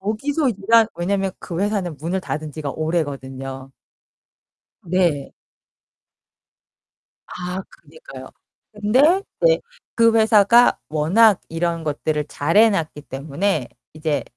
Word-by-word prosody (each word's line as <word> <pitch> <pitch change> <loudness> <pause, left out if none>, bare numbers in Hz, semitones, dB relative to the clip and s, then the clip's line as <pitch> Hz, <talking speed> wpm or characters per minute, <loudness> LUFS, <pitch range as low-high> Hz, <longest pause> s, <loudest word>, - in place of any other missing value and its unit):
거기서 275 +9 -1
일한 225 +2 +3
왜냐면 195 +2 -1
그 170 -3 -6
회사는 200 -6 -1
문을 170 +6 -3
닫은 155 -4 -5
지가 150 -2 -5
오래거든요. 135 -4 -4 1.1
네. 170 -5 0 2.0
아 180 +1 -5 0.2
그니까요. 145 -4 -12 0.5
근데 255 - +3 0.2
이제 - - +4 0.4
그 230 -1 +4
회사가 220 +2 +5
워낙 185 +8 +3
이런 165 0 -2
것들을 150 0 -2
잘해 170 +13 +3
놨기 160 -7 -3
때문에 145 +2 -2 0.3
이제 155 -4 -2
175 Hz, 220 characters per minute, -21 LUFS, 150-210 Hz, 2.0 s, 회사가